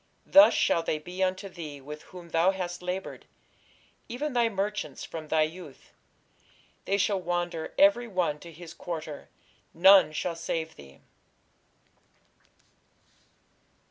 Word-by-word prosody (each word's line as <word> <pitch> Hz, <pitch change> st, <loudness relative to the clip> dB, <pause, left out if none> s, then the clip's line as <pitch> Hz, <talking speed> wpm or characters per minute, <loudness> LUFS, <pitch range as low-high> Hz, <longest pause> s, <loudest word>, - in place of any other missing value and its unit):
Thus 295 Hz, +1 st, +7 dB
shall 165 Hz, -, +2 dB
they 160 Hz, -, -1 dB
be 180 Hz, +4 st, -8 dB
unto 185 Hz, +1 st, -1 dB
thee 160 Hz, -6 st, -8 dB
with 150 Hz, +3 st, -9 dB
whom 175 Hz, -2 st, -11 dB
thou 165 Hz, +3 st, +3 dB
hast 180 Hz, -2 st, -3 dB
laboured, 180 Hz, +2 st, -5 dB, 0.8 s
even 280 Hz, +4 st, -3 dB
thy 240 Hz, -2 st, +3 dB
merchants, 195 Hz, -8 st, -3 dB
from 160 Hz, -1 st, -7 dB
thy 155 Hz, 0 st, +3 dB
youth: 155 Hz, -3 st, -8 dB, 0.9 s
they 200 Hz, -, +1 dB
shall 200 Hz, -1 st, +1 dB
wander 175 Hz, -2 st, -3 dB
every 290 Hz, -5 st, +5 dB
one 180 Hz, -7 st, -1 dB
to 170 Hz, -, -11 dB
his 165 Hz, +1 st, -11 dB
quarter; 155 Hz, -5 st, -7 dB, 0.5 s
none 190 Hz, -2 st, +7 dB
shall 165 Hz, +2 st, -3 dB
save 165 Hz, -1 st, -4 dB
thee. 70 Hz, -1 st, -15 dB
175 Hz, 125 wpm, -28 LUFS, 160-190 Hz, 0.9 s, Thus